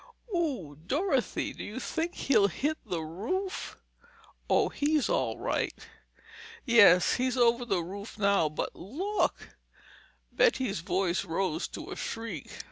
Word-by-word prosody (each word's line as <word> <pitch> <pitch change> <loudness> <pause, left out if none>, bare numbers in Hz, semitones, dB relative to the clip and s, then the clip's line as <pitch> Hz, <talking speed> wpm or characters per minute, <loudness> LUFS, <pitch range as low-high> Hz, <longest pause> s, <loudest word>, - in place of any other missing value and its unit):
Ooh, 265 - -1
Dorothy—do 280 - -1
you 215 +5 -6
think 330 +6 -3
he'll 220 -7 +3
hit 295 - -2
the 175 -5 -2
roof?" 350 - -4 0.7
"Oh, - - +3
he's 295 -1 +1
all - - 0
right—" - - -1 0.9
"Yes, 205 -8 +7
he's 255 +1 0
over 240 0 +3
the 195 -7 0
roof 200 +6 -8
now—but 200 -7 +1
look!" 365 - -2 0.8
Betty's 260 - +2
voice 180 +1 0
rose 175 -2 -1
to - - -8
a - - -4
shriek. 225 - -5
225 Hz, 120 wpm, -29 LUFS, 185-290 Hz, 0.9 s, Yes